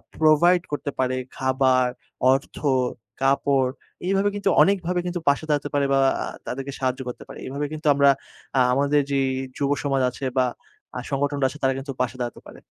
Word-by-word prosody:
provide 165 Hz, +3 st, +4 dB
করতে 145 Hz, -1 st, -3 dB
পারে 130 Hz, 0 st, +1 dB, 0.2 s
খাবার, 130 Hz, -1 st, +2 dB, 0.4 s
অর্থ, 135 Hz, +1 st, -1 dB, 0.6 s
কাপড় 135 Hz, -1 st, +2 dB, 0.4 s
এভাবে 195 Hz, +1 st, +2 dB
কিন্তু 200 Hz, -1 st, 0 dB
অনেকভাবে 180 Hz, -2 st, +2 dB
কিন্তু 175 Hz, 0 st, -2 dB
পাশে 140 Hz, +2 st, +1 dB
দাঁড়াতে 145 Hz, -1 st, 0 dB
পারে 145 Hz, -1 st, +2 dB
বা 135 Hz, -, +4 dB, 0.2 s
আ -, -, -3 dB, 0.2 s
তাদেরকে 135 Hz, +2 st, -4 dB
সাহায্য 130 Hz, -1 st, -1 dB
করতে 125 Hz, -, -6 dB
পারে। -, -, -10 dB
এভাবে 140 Hz, +2 st, -3 dB
কিন্তু 155 Hz, 0 st, -4 dB
আমরা 140 Hz, 0 st, +5 dB, 0.5 s
আ -, -, +5 dB
আমাদের 145 Hz, +2 st, +3 dB
যেই 135 Hz, -1 st, +2 dB, 0.3 s
যুবসমাজ 140 Hz, -1 st, 0 dB
আছে 130 Hz, +2 st, -7 dB
বা 130 Hz, -, +4 dB, 0.5 s
আ -, -, -2 dB
সংগঠনরা 140 Hz, 0 st, 0 dB
আছে 150 Hz, -, -10 dB
তারা 135 Hz, 0 st, +3 dB
কিন্তু 135 Hz, +1 st, -5 dB
পাশে 125 Hz, 0 st, -1 dB
দাঁড়াতে 120 Hz, -1 st, -4 dB
পারে। -, -, -13 dB
140 Hz, 170 wpm, -24 LUFS, 130-150 Hz, 0.6 s, আমরা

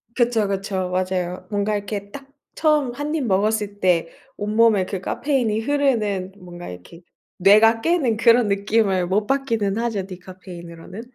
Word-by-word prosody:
그쵸, 235 Hz, -4 st, +2 dB
그쵸. 195 Hz, -2 st, -2 dB
맞아요. 185 Hz, 0 st, -2 dB
뭔가 205 Hz, 0 st, -1 dB
이렇게 200 Hz, 0 st, -5 dB
딱 275 Hz, +2 st, -10 dB, 0.3 s
처음 300 Hz, -5 st, +2 dB
1 290 Hz, +4 st, -3 dB
입 295 Hz, -5 st, -1 dB
먹었을 205 Hz, 0 st, 0 dB
때 175 Hz, -3 st, +2 dB, 0.3 s
온몸에 210 Hz, -2 st, +3 dB
그 190 Hz, -2 st, -5 dB
카페인이 245 Hz, -7 st, -1 dB
흐르는 220 Hz, -9 st, 0 dB
뭔가 175 Hz, -2 st, -10 dB
이렇게 90 Hz, -, -12 dB, 0.4 s
뇌가 215 Hz, +4 st, +5 dB
깨는 275 Hz, -8 st, +1 dB
그런 230 Hz, 0 st, +4 dB
느낌을 200 Hz, -2 st, +1 dB
못 205 Hz, +3 st, +1 dB
받기는 230 Hz, -7 st, 0 dB
하죠 225 Hz, -5 st, -2 dB
디카페인으로는. 180 Hz, 0 st, -10 dB
205 Hz, 310 characters per minute, -22 LUFS, 185-230 Hz, 0.4 s, 뇌가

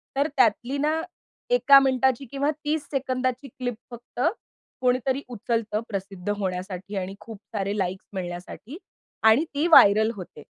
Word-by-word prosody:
तर 280 Hz, +3 st, +2 dB
त्यातली 240 Hz, +5 st, +2 dB
ना, 310 Hz, +3 st, 0 dB, 0.5 s
1का 285 Hz, -, +7 dB
मिनिटाची 265 Hz, -1 st, +1 dB
किंवा 280 Hz, +2 st, 0 dB
30 300 Hz, 0 st, -1 dB
सेकंदाची 255 Hz, -1 st, -2 dB
क्लिप 245 Hz, -1 st, -5 dB, 0.2 s
फक्त 240 Hz, 0 st, -11 dB, 0.6 s
कोणीतरी 255 Hz, +2 st, +1 dB
उचलतं 225 Hz, -2 st, -2 dB
प्रसिद्ध 195 Hz, -1 st, -5 dB
होण्यासाठी 190 Hz, +1 st, -4 dB
आणि 190 Hz, +1 st, -4 dB
खूप 225 Hz, -1 st, -10 dB, 0.2 s
सारे 200 Hz, +1 st, -1 dB
लाइक्स 190 Hz, 0 st, -3 dB
मिळण्यासाठी 185 Hz, -, -7 dB, 0.5 s
आणि 220 Hz, +7 st, +6 dB
ती 300 Hz, +4 st, +1 dB
व्हायरल 220 Hz, -7 st, +7 dB
होते 180 Hz, -5 st, -10 dB
240 Hz, 130 wpm, -25 LUFS, 200-275 Hz, 0.6 s, 1का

